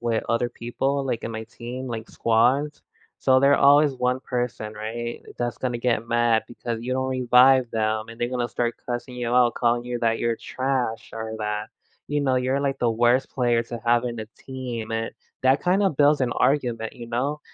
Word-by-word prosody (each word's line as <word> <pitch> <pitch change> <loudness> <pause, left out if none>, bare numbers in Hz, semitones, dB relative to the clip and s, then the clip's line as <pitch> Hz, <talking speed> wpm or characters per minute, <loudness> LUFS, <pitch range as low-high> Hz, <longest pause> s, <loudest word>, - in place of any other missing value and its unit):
with 115 -2 0
other 115 +1 +1
people, 135 +4 -2
like, 120 -4 -2
in 115 - -4
my 110 0 -4
team, 120 +3 -7
like, 115 -1 -5
squads, 125 +6 +1 0.4
so 130 -1 +4
they're 140 +1 +5
always 145 +1 +5
one 125 +1 0
person, 120 -4 -3
right, 115 +2 -5 0.2
that's 120 -1 -3
gonna 125 -2 -2
get 120 -2 0
mad 115 -1 +2
because 120 -1 -5
you 125 +2 -2
don't 130 0 -1
revive 130 0 +5
them, 110 0 0
and 115 +1 -11
they 120 - 0
gonna 125 -1 -2
start 120 0 -2
cussing 125 +1 -4
you 120 -1 -1
out, 125 -1 +4
calling 120 0 +1
you 125 0 -3
that 115 -1 +1
you're 115 -1 0
trash 130 -4 -2
or 110 0 -5
that, 105 0 -3 0.4
you 145 0 -1
know, 135 -2 +1
you're 130 +2 0
like, 140 -1 -1
the 120 - +2
worst 120 +3 +2
player 120 -3 +1
to 115 0 -7
have 120 +1 +3
in 120 -2 -3
a 110 - -6
team 125 -4 -6
and 115 0 -2 0.3
that 130 +2 +4
kind 185 +3 +2
of 190 -8 +1
builds 145 0 +4
an 125 - 0
argument, 120 -6 0
you 120 -1 -9
know. 135 +6 -2
120 Hz, 200 wpm, -24 LUFS, 115-130 Hz, 0.4 s, they're